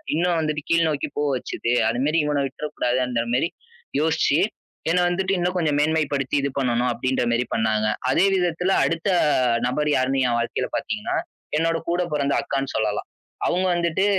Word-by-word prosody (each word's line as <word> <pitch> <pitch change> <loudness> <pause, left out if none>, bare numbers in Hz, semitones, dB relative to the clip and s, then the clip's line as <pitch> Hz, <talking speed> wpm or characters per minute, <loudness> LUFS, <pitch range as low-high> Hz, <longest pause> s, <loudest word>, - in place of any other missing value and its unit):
இன்னும் 175 0 +1
வந்துட்டு 155 -1 -1
கீழ் 165 0 +4
நோக்கிப் 145 -1 -3
போக 145 0 +1
வச்சது. 120 - -3 0.2
அதுமாரி 135 +7 0
இவன 145 -1 +1
விட்றக்கூடாதுன்றமாரிமாரி 125 -1 -1 0.5
யோசிச்சு 155 -1 +2 0.5
என்ன 180 - +3
வந்துட்டு 190 +2 0
இன்னும் 180 +1 -1
கொஞ்சம் 155 -4 +1
மேன்மைப்படுத்தி 150 -3 0
இது 140 - 0
பண்ணணும் 125 -1 +1
அப்பிடின்றமாரி 120 -1 0
பண்ணாங்க. 110 -1 +1 0.2
அதே 180 - +4
விதத்துல 180 +1 +1
அடுத்த 165 +2 -2 0.6
நபர் 150 +4 0
யாருன்னு 130 +1 +1
என் 120 -1 +1
வாழ்க்கையில 115 0 -2
பார்த்தீங்கன்னா, - - -2 0.4
என்னோட 165 0 +1
கூடப் 175 -1 0
பிறந்த 140 -1 +1
அக்கான்னு 135 -1 -3
சொல்லலாம். 105 -1 -1 0.4
அவுங்க 185 +2 +1
வந்துட்டு 170 +2 +1
145 Hz, 145 wpm, -23 LUFS, 125-165 Hz, 0.6 s, கீழ்